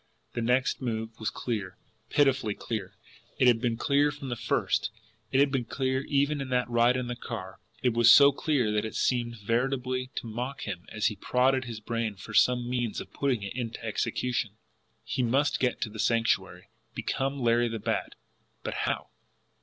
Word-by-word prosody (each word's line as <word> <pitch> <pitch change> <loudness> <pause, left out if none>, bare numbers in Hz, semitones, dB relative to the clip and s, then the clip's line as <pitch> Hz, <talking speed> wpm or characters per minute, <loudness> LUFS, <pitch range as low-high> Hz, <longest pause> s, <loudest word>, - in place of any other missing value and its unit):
The 120 - -2
next 125 +4 +1
move 115 -2 -2
was 110 - -1
clear, 100 -6 -4 0.3
pitifully 135 -7 +2
clear; 105 -6 -5 0.4
it - - +3
had 115 -2 +5
been 120 -2 0
clear 145 +4 +3
from 145 -2 -7
the 120 - -1
first, - - 0 0.4
it 135 - +3
had 140 0 +4
been 130 -3 0
clear 130 +2 -1
even 145 0 +1
in 135 - -5
that 125 -1 +1
ride 120 +1 +3
in 125 - -2
the 120 0 -4
car 95 -5 -7 0.2
it 125 -2 +3
was 115 0 +5
so 140 +2 +9
clear 140 -6 0
that 105 0 +1
it 110 - -5
seemed 120 -2 0
veritably 130 +4 -1
to - - -4
mock 125 +5 -4
him 90 -4 -5
as 110 -1 -2
he 105 - +2
prodded 130 +4 +2
his 115 -3 -6
brains 110 -2 -3
for 105 - -9
some 125 +2 +4
means 120 -3 -1
of - - -9
putting 130 -7 0
it 100 - -5
into 115 -2 -5
execution. 115 -1 -1 0.5
He - - -2
must 135 +5 +2
get 125 -2 +1
to - - -1
the 110 - -9
Sanctuary, 115 +1 0 0.3
become 135 +1 -2
Larry 120 -1 +3
the 115 -1 -3
Bat 105 - -2 0.5
but - - -3 0.2
how? - - -3
120 Hz, 185 wpm, -28 LUFS, 115-130 Hz, 0.5 s, so